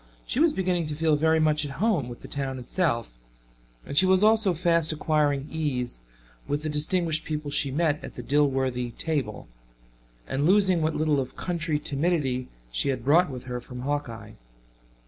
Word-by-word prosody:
She 250 Hz, -, -2 dB
was 325 Hz, 0 st, +5 dB
beginning 180 Hz, -, -1 dB
to 150 Hz, -, -3 dB
feel 160 Hz, 0 st, +2 dB
very 160 Hz, +2 st, +3 dB
much 155 Hz, -1 st, +2 dB
at 140 Hz, -2 st, -5 dB
home 190 Hz, -, +1 dB
with 120 Hz, -, -10 dB
the -, -, -8 dB
town 135 Hz, -2 st, -3 dB
itself, 125 Hz, -, -1 dB, 0.7 s
and -, -, -6 dB
she 185 Hz, +6 st, +7 dB
was 190 Hz, +1 st, +4 dB
also 215 Hz, -4 st, +4 dB
fast 165 Hz, -1 st, +2 dB
acquiring 150 Hz, -2 st, 0 dB
ease 130 Hz, -, -2 dB, 0.5 s
with 145 Hz, +1 st, -2 dB
the 155 Hz, -, -2 dB
distinguished 160 Hz, +1 st, 0 dB
people 150 Hz, -2 st, -4 dB
she 140 Hz, -, +1 dB
met 150 Hz, +1 st, 0 dB
at -, -, -8 dB
the -, -, -7 dB
Dilworthy 130 Hz, -4 st, 0 dB
table, 140 Hz, -10 st, -2 dB, 0.8 s
and 140 Hz, +3 st, 0 dB
losing 190 Hz, -3 st, +4 dB
what 155 Hz, 0 st, 0 dB
little 155 Hz, -2 st, +1 dB
of 130 Hz, -1 st, -4 dB
country 165 Hz, -3 st, -1 dB
timidity 140 Hz, -4 st, -1 dB, 0.2 s
she -, -, 0 dB
had 130 Hz, -3 st, -2 dB
brought 160 Hz, +5 st, +4 dB
with 125 Hz, -3 st, -7 dB
her 125 Hz, -1 st, -5 dB
from 125 Hz, 0 st, -8 dB
Hawkeye. 140 Hz, -4 st, -4 dB
150 Hz, 175 wpm, -26 LUFS, 135-165 Hz, 0.8 s, she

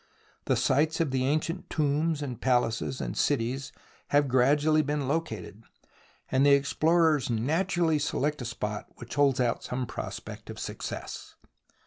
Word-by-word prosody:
The -, -, +2 dB
sites 155 Hz, +4 st, +2 dB
of 160 Hz, -5 st, +1 dB
the 130 Hz, -1 st, 0 dB
ancient 155 Hz, +5 st, -1 dB
tombs 150 Hz, 0 st, 0 dB
and 125 Hz, -4 st, -6 dB
palaces 115 Hz, -, +1 dB
and -, -, -4 dB
cities 125 Hz, +4 st, 0 dB, 0.4 s
have 145 Hz, 0 st, +3 dB
gradually 145 Hz, +5 st, +3 dB
been 145 Hz, -2 st, -2 dB
located, 115 Hz, -, -3 dB, 0.7 s
and 130 Hz, +1 st, +3 dB
the 140 Hz, 0 st, +6 dB
explorers 155 Hz, 0 st, +2 dB
naturally 160 Hz, -, +1 dB
select 150 Hz, 0 st, -1 dB
a -, -, -4 dB
spot 105 Hz, -2 st, -4 dB
which 120 Hz, -1 st, -9 dB
holds 140 Hz, -3 st, +3 dB
out 120 Hz, -2 st, 0 dB
some 125 Hz, 0 st, -3 dB
prospect -, -, -7 dB
of -, -, -7 dB
success. -, -, -6 dB
140 Hz, 140 wpm, -28 LUFS, 125-155 Hz, 0.7 s, the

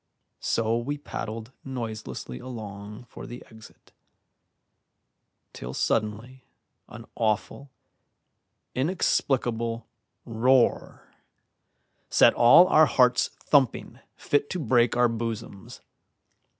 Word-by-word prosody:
So 115 Hz, +1 st, 0 dB
we 145 Hz, +5 st, -4 dB
paddled 115 Hz, -4 st, -7 dB
noiselessly 110 Hz, -, -6 dB
along 105 Hz, -3 st, -9 dB
for 120 Hz, -, -11 dB
the 120 Hz, -, -10 dB
exit, 110 Hz, -1 st, -17 dB, 1.6 s
till 65 Hz, +2 st, -8 dB
suddenly 115 Hz, +4 st, -2 dB, 0.5 s
an -, -, -11 dB
awful, 110 Hz, +5 st, -2 dB, 1.0 s
inexplicable 120 Hz, -6 st, -1 dB, 0.4 s
roar 125 Hz, +2 st, +1 dB, 1.0 s
set -, -, +5 dB
all 145 Hz, +9 st, +7 dB
our 155 Hz, 0 st, +6 dB
hearts 125 Hz, -1 st, +3 dB
thumping 140 Hz, -5 st, +1 dB, 0.2 s
fit 145 Hz, 0 st, -1 dB
to 185 Hz, -, -3 dB
break 120 Hz, -4 st, +2 dB
our 120 Hz, 0 st, +4 dB
bosoms. 115 Hz, -4 st, -6 dB
120 Hz, 85 wpm, -26 LUFS, 110-130 Hz, 1.6 s, all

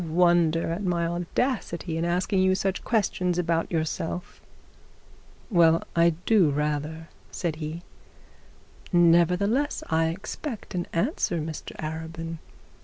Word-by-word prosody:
You -, -, -6 dB
wonder 165 Hz, -1 st, +3 dB
at 175 Hz, +5 st, -3 dB
my 175 Hz, -2 st, 0 dB
audacity 175 Hz, 0 st, -2 dB
in 165 Hz, +1 st, -1 dB
asking 180 Hz, +3 st, +1 dB
you 185 Hz, 0 st, +4 dB
such 195 Hz, 0 st, -1 dB
questions 185 Hz, -5 st, 0 dB
about 165 Hz, -2 st, 0 dB
yourself.' 165 Hz, +1 st, -3 dB, 1.1 s
'Well, 165 Hz, -3 st, +5 dB
I 170 Hz, -1 st, +4 dB
do 200 Hz, -8 st, +5 dB
rather,' 150 Hz, +2 st, -2 dB, 0.2 s
said 165 Hz, -4 st, -3 dB
he. 160 Hz, +2 st, -5 dB, 1.1 s
'Nevertheless 180 Hz, -, +3 dB
I 160 Hz, 0 st, +3 dB
expect 210 Hz, -, -5 dB
an 175 Hz, -1 st, -2 dB
answer, 175 Hz, -, 0 dB
Mr 155 Hz, 0 st, -6 dB
Arabin. 160 Hz, +1 st, -5 dB
170 Hz, 115 wpm, -26 LUFS, 160-180 Hz, 1.1 s, Well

